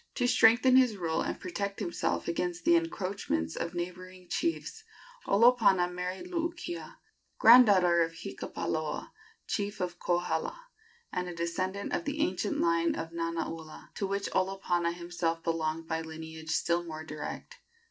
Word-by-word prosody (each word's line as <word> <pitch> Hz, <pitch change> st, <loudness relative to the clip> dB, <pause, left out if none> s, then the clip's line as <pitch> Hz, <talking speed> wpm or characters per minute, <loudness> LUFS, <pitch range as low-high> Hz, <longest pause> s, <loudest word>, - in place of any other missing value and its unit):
To 245 Hz, -, +1 dB
strengthen 245 Hz, +2 st, +6 dB
his 250 Hz, -5 st, +4 dB
rule 165 Hz, -3 st, -1 dB
and -, -, -3 dB
protect 200 Hz, +2 st, -4 dB
himself 170 Hz, -, -2 dB
against 175 Hz, +1 st, -2 dB
the 340 Hz, -, +6 dB
encroachments 200 Hz, -, -1 dB
of 170 Hz, +1 st, -4 dB
neighboring 180 Hz, +1 st, -6 dB
chiefs, 340 Hz, +6 st, -2 dB, 0.4 s
Olopana 200 Hz, -5 st, +4 dB
married 180 Hz, -, -4 dB
Luukia, 345 Hz, 0 st, -4 dB, 0.4 s
granddaughter 200 Hz, -8 st, +7 dB
of 165 Hz, 0 st, 0 dB
Hikapaloa, 165 Hz, -, -4 dB, 0.3 s
chief 205 Hz, -1 st, -2 dB
of 180 Hz, -1 st, -3 dB
Kohala, 325 Hz, -, -1 dB, 0.5 s
and 180 Hz, 0 st, -2 dB
a 175 Hz, -, -7 dB
descendant 185 Hz, +4 st, -2 dB
of -, -, -1 dB
the 290 Hz, +1 st, -3 dB
ancient 190 Hz, 0 st, 0 dB
line 170 Hz, 0 st, +2 dB
of 165 Hz, 0 st, -5 dB
Nanaula, 165 Hz, -1 st, -5 dB
to 195 Hz, -, -2 dB
which 200 Hz, +1 st, -2 dB
Olopana 185 Hz, -3 st, 0 dB
himself 170 Hz, -1 st, -3 dB
belonged 165 Hz, -1 st, -1 dB
by 160 Hz, 0 st, -1 dB
lineage 160 Hz, 0 st, -8 dB
still 170 Hz, +2 st, +1 dB
more 155 Hz, -2 st, -7 dB
direct. 150 Hz, -1 st, -7 dB
180 Hz, 135 wpm, -30 LUFS, 165-200 Hz, 0.5 s, granddaughter